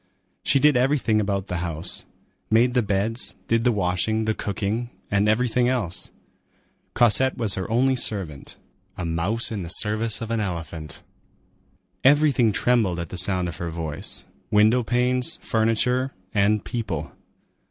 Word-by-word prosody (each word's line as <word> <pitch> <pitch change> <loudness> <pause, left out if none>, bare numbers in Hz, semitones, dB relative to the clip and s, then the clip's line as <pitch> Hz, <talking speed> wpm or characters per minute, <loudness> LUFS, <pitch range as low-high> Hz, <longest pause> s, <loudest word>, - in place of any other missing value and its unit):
She - - +2
did 150 +1 +4
everything 125 -4 +2
about 100 -2 -1
the 90 - -4
house,—made 90 +7 -2
the 125 - +3
beds, 105 +3 -1
did 115 0 +1
the 125 - +3
washing, 105 +2 0
the 110 - +1
cooking, 105 +4 -3 0.2
and 100 +1 +2
everything 120 +2 +2
else. 105 -9 -2 0.9
Cosette 125 +3 +3
was 110 -5 0
her 95 - -4
only 130 +4 +2
servant; 95 - -3 0.4
a 90 - -4
mouse 85 +9 +1
in 105 -3 -3
the 85 - -6
service 110 +4 +3
of 115 -1 -5
an 115 - 0
elephant. 85 -5 -5 1.0
Everything 140 -5 +4
trembled 110 -5 +1
at 85 -2 -5
the - - -7
sound 90 -1 0
of 85 - -6
her 85 - -4
voice,—window 105 +8 0
panes, 125 +2 +1
furniture, 125 +4 +1 0.2
and 105 0 +2
people. 95 - -4
110 Hz, 140 wpm, -24 LUFS, 90-120 Hz, 1.0 s, did